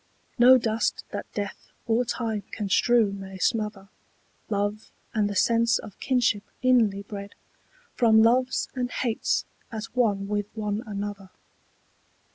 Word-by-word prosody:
No 255 Hz, +2 st, +8 dB
dust 225 Hz, -2 st, -1 dB
that 205 Hz, -, -6 dB
death 205 Hz, -2 st, -5 dB, 0.2 s
or 230 Hz, +2 st, +2 dB
time 225 Hz, -3 st, -2 dB
can 210 Hz, -3 st, -4 dB
strew 230 Hz, +1 st, +4 dB
may 195 Hz, -1 st, -8 dB
smother 210 Hz, 0 st, -1 dB, 0.6 s
Love 205 Hz, 0 st, -2 dB, 0.2 s
and 210 Hz, -2 st, +1 dB
the 205 Hz, -, -4 dB
sense 230 Hz, +2 st, +3 dB
of 210 Hz, -, -10 dB
kinship 245 Hz, -5 st, +1 dB, 0.2 s
inly 225 Hz, -6 st, +3 dB
bred 200 Hz, 0 st, -8 dB, 0.6 s
From 220 Hz, -2 st, +5 dB
loves 250 Hz, +3 st, +2 dB
and 250 Hz, -2 st, -2 dB
hates 235 Hz, -3 st, -1 dB, 0.3 s
at 220 Hz, -2 st, -4 dB
one 205 Hz, -5 st, +1 dB
with 205 Hz, 0 st, -1 dB
one 210 Hz, -1 st, -2 dB
another. 200 Hz, -2 st, -5 dB
215 Hz, 130 wpm, -26 LUFS, 205-235 Hz, 0.6 s, No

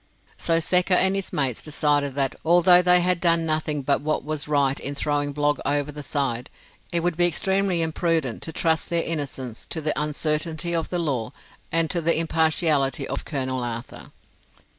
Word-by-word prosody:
So 165 Hz, 0 st, +1 dB
Secker 180 Hz, +2 st, +3 dB
and 190 Hz, +1 st, +3 dB
his 195 Hz, -1 st, -3 dB
mates 130 Hz, -5 st, 0 dB
decided 145 Hz, -2 st, 0 dB
that, 135 Hz, -2 st, +1 dB
although 175 Hz, +2 st, +6 dB
they 180 Hz, 0 st, +5 dB
had 180 Hz, 0 st, +1 dB
done 170 Hz, -1 st, +3 dB
nothing 155 Hz, -2 st, -1 dB
but 140 Hz, +1 st, +1 dB
what 155 Hz, -1 st, -1 dB
was 150 Hz, 0 st, -3 dB
right 140 Hz, -2 st, +1 dB
in 140 Hz, +1 st, -5 dB
throwing 145 Hz, 0 st, -1 dB
Blogg 145 Hz, +1 st, 0 dB
over 145 Hz, +1 st, -1 dB
the 150 Hz, 0 st, -7 dB
side, 135 Hz, -4 st, -2 dB, 0.4 s
it 170 Hz, -1 st, +1 dB
would 175 Hz, -1 st, -1 dB
be 175 Hz, +1 st, +4 dB
extremely 190 Hz, +1 st, 0 dB
imprudent 160 Hz, -6 st, -1 dB
to 160 Hz, -, -5 dB
trust 160 Hz, 0 st, 0 dB
their 170 Hz, -1 st, 0 dB
innocence 135 Hz, -7 st, -5 dB
to 160 Hz, -, -4 dB
the 155 Hz, -1 st, 0 dB
uncertainty 155 Hz, +3 st, -2 dB
of 165 Hz, -1 st, -2 dB
the 180 Hz, -, -2 dB
law 135 Hz, -8 st, -2 dB, 0.4 s
and 165 Hz, 0 st, +2 dB
to 170 Hz, -, 0 dB
the 165 Hz, 0 st, +2 dB
impartiality 160 Hz, -4 st, +1 dB
of -, -, -4 dB
Colonel 130 Hz, -3 st, -2 dB
Arthur. 115 Hz, 0 st, -7 dB
155 Hz, 180 wpm, -24 LUFS, 140-170 Hz, 0.4 s, although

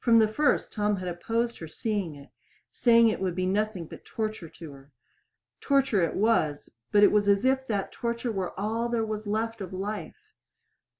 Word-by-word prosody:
From 230 Hz, -2 st, +5 dB
the 220 Hz, -1 st, +5 dB
first 290 Hz, +8 st, +1 dB
Tom 210 Hz, -1 st, +1 dB
had 185 Hz, -1 st, -5 dB
opposed 230 Hz, +7 st, -2 dB
her 160 Hz, -, -7 dB
seeing 195 Hz, -1 st, -3 dB
it, 140 Hz, -1 st, -14 dB, 0.4 s
saying 230 Hz, -1 st, +5 dB
it 215 Hz, -, -2 dB
would 185 Hz, -2 st, -1 dB
be 185 Hz, 0 st, -1 dB
nothing 200 Hz, -2 st, -1 dB
but -, -, -12 dB
torture 215 Hz, -6 st, -4 dB
to 160 Hz, -2 st, -11 dB
her. 135 Hz, +1 st, -15 dB, 0.7 s
Torture 270 Hz, -8 st, +2 dB
it 165 Hz, -, 0 dB
was, 190 Hz, -9 st, +1 dB, 0.2 s
but 205 Hz, 0 st, +5 dB
it -, -, +7 dB
was 205 Hz, -1 st, +3 dB
as 200 Hz, +4 st, +3 dB
if 265 Hz, 0 st, +2 dB
that 205 Hz, -3 st, -2 dB
torture 235 Hz, 0 st, -3 dB
were 190 Hz, -3 st, -4 dB
all 225 Hz, +3 st, -1 dB
there 230 Hz, -2 st, 0 dB
was 215 Hz, -1 st, -4 dB
left 225 Hz, +1 st, -2 dB
of 185 Hz, -, -6 dB
life. 205 Hz, -, -5 dB
210 Hz, 190 wpm, -27 LUFS, 185-230 Hz, 0.7 s, it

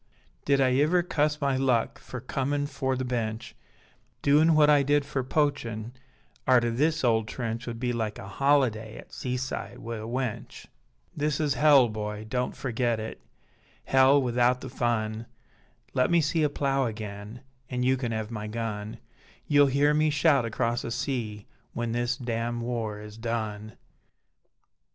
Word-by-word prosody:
Did 140 Hz, -1 st, +3 dB
I 130 Hz, -1 st, +4 dB
iver 175 Hz, +4 st, +3 dB
cuss 150 Hz, -3 st, 0 dB
my 140 Hz, -2 st, +1 dB
luck 130 Hz, -3 st, +1 dB
Fer 130 Hz, -, -8 dB
comin' 140 Hz, +3 st, -1 dB
fore 135 Hz, -2 st, -2 dB
the 130 Hz, 0 st, -3 dB
Bench; 115 Hz, -3 st, -3 dB, 0.7 s
Doin 155 Hz, +3 st, +5 dB
what 150 Hz, -1 st, +6 dB
I 145 Hz, -1 st, +6 dB
did 145 Hz, +1 st, +2 dB
fer 140 Hz, -2 st, -2 dB
poachin, 125 Hz, -5 st, -1 dB, 0.6 s
Arter 120 Hz, -2 st, +4 dB
this 155 Hz, +6 st, +1 dB
ole 115 Hz, -2 st, +3 dB
trench 115 Hz, +1 st, -4 dB
Would 115 Hz, -1 st, -5 dB
be 125 Hz, 0 st, -1 dB
like 110 Hz, -3 st, -2 dB
a 95 Hz, -, -8 dB
holiday 115 Hz, -2 st, +1 dB
At -, -, -13 dB
seaside 125 Hz, +1 st, -4 dB
wi' 115 Hz, 0 st, -6 dB
a 110 Hz, +1 st, -6 dB
wench. 125 Hz, -2 st, -4 dB, 0.5 s
This 150 Hz, -1 st, 0 dB
is 150 Hz, -3 st, +1 dB
Hell, 145 Hz, -4 st, +6 dB
boy, 105 Hz, -1 st, -5 dB
don't 125 Hz, +2 st, -2 dB
ferget 120 Hz, -2 st, -1 dB
it, 110 Hz, +1 st, -6 dB, 0.6 s
Hell 135 Hz, +2 st, +5 dB
wi'out 125 Hz, -1 st, +2 dB
the 130 Hz, -, -6 dB
fun, 115 Hz, -2 st, -1 dB, 0.7 s
Let 125 Hz, -1 st, +2 dB
me 170 Hz, -1 st, +4 dB
see 160 Hz, +1 st, +1 dB
a 150 Hz, -, +3 dB
plough 135 Hz, -2 st, 0 dB
agen 105 Hz, +1 st, -7 dB, 0.3 s
An 125 Hz, -1 st, -2 dB
you 130 Hz, +1 st, +3 dB
can 125 Hz, -3 st, -3 dB
ev 110 Hz, 0 st, -3 dB
my 105 Hz, -2 st, -5 dB
gun; 110 Hz, -1 st, -4 dB, 0.5 s
You'll 145 Hz, -1 st, +5 dB
hear 140 Hz, +2 st, +3 dB
me 155 Hz, +1 st, +3 dB
shout 145 Hz, -3 st, +3 dB
across 115 Hz, +1 st, -1 dB
the -, -, -5 dB
sea 115 Hz, -4 st, -3 dB, 0.3 s
When 120 Hz, -1 st, -2 dB
this 120 Hz, +1 st, -1 dB
damn 120 Hz, -2 st, -2 dB
war 115 Hz, -3 st, -3 dB
is 105 Hz, +1 st, -10 dB
done. 110 Hz, -2 st, -3 dB
125 Hz, 160 wpm, -27 LUFS, 115-140 Hz, 0.7 s, what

